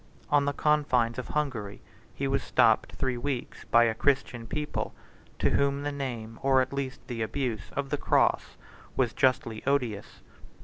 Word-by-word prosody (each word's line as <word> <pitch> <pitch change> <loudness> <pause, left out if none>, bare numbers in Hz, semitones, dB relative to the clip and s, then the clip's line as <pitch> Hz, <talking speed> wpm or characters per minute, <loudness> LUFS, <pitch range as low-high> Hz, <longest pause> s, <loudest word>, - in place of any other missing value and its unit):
On 145 -1 +4
the 145 - +1
confines 130 -7 +2
of 125 - -5
Hungary 120 -10 -2 0.4
he 140 - -1
was 135 0 +1
stopped 110 -2 +3
three 130 -2 -1
weeks 125 0 -4
by 120 0 +5
a 115 -1 +2
Christian 120 -1 0
people, 150 +2 -3 0.4
to - - +2
whom 140 0 +1
the 145 - -1
name, 120 -5 -5
or 135 -1 +4
at 130 +1 0
least 135 -1 -4
the 120 -2 -5
abuse, 110 -1 -2
of 140 -1 -3
the 145 - +1
cross - - +2 0.4
was 125 -4 +2
justly 125 -4 +1
odious. 125 -8 -1
130 Hz, 165 wpm, -28 LUFS, 115-140 Hz, 0.4 s, by